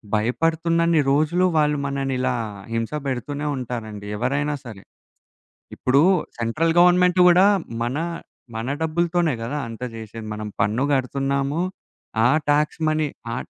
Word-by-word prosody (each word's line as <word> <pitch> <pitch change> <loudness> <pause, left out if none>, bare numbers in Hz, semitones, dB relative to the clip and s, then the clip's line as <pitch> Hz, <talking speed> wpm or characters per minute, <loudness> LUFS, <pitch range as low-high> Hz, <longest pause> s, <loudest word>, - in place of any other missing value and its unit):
భయపడుతున్నన్ని 165 +8 +1
రోజులు 155 +6 +2
వాళ్ళు, 150 -1 +2
మనని 135 -1 -2
ఇలా 130 - +1 0.4
హింస 115 -1 -2
పెడుతూనే 140 +3 -3
ఉంటారండి 115 -5 -6
ఎవరైనా 140 +5 0
సరే. 110 -5 -10 0.9
ఇప్పుడూ 135 +2 +3 0.4
సెంట్రల్ 135 +9 0
గవర్నమెంట్ 180 +1 +5
గూడా 180 +2 +6 0.4
మన, 120 +3 -1 0.6
మన 115 +2 -3
డబ్బులతోనే 170 0 +1
గదా! 145 +6 -3
అంత 115 +1 -9
జేశేది. 110 0 -8
మనం 105 0 -5
పన్ను 110 +6 +1
కడుతున్నాము. 140 +3 0 0.6
ఆ - - +7 0.2
టాక్స్ 150 +2 +1
మనీ 155 0 +1 0.3
ఆ - - -3
140 Hz, 120 wpm, -22 LUFS, 120-160 Hz, 0.9 s, ఆ